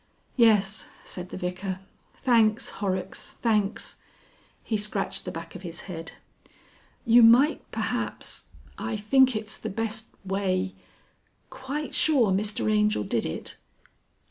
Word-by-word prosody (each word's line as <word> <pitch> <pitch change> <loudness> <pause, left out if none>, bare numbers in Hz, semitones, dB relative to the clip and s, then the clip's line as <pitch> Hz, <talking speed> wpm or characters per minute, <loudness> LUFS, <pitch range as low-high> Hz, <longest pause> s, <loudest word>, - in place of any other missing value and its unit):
"Yes," 215 -4 +3 0.2
said 180 0 -6
the - - -6
Vicar. 185 +1 -3 0.4
"Thanks, 225 -3 +3
Horrocks, 190 -2 -2
thanks!" 215 -3 0 0.7
He 220 - -1
scratched 205 -1 -2
the - - -3
back 165 +1 -8
of 185 - -9
his 170 -2 -4
head. 165 -3 -7 0.9
"You 235 +1 +7
might 245 +7 +5
perhaps... - - -2 0.3
I 220 - -2
think 260 +4 +4
it's 215 0 -3
the - - -5
best 220 +1 -2 0.2
way... 190 -1 0 0.8
Quite 275 +3 -5
sure 260 -10 +3
Mr 205 +3 0
Angel 210 - +2
did 115 +2 -1
it?" 80 - -5
210 Hz, 120 wpm, -27 LUFS, 190-230 Hz, 0.9 s, You